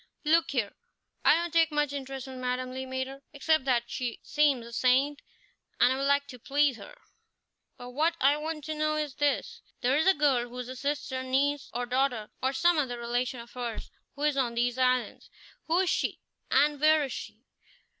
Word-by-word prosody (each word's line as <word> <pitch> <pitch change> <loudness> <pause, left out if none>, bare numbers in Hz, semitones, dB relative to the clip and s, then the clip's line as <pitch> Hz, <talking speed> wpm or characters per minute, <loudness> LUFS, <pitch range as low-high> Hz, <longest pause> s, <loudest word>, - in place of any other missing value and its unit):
"Look 330 +2 +3
here! 235 -7 -1 0.5
I - - +6
don't 340 0 -2
take 330 -1 +4
much 295 -1 0
interest 270 -1 -6
in 260 -1 -8
Madame 255 0 -2
Le 260 0 -5
Maître, 260 +1 -4
except 305 0 +1
that 245 -3 +2
she 240 -1 -4
seems 285 -5 +2
a 235 - -11
saint 265 +4 +2 0.6
and 245 +1 +5
I'd 265 - -3
like 280 0 +3
to 250 - -10
please 285 0 +1
her; - - -12 0.8
but 245 0 -9
what 320 +6 +1
I 280 +2 +4
want 305 0 -4
to 310 +2 -3
know 305 0 0
is 300 -2 -2
this 290 +1 -1 0.2
there 255 +2 +2
is 315 +4 +2
a 380 - +6
girl 265 -5 +2
who 245 - -10
is 250 0 -5
a 255 - -6
sister, 280 0 -2
or - - -4
niece, 275 +2 0
or 245 +1 -2
daughter, 245 -3 0
or 260 - +1
some 340 +4 +3
other 250 -4 -1
relation 240 +1 -2
of 235 - -14
hers, 240 -3 -5 0.2
who 285 - -6
is 300 -2 +2
on 240 -3 0
these 245 +1 0
islands. 255 -1 0 0.4
Who 330 +2 +2
is 375 - +1
she, - - -1 0.3
and 290 -1 +3
where 310 0 +5
is 270 - -4
she?" - - -8
270 Hz, 205 wpm, -29 LUFS, 250-295 Hz, 0.8 s, I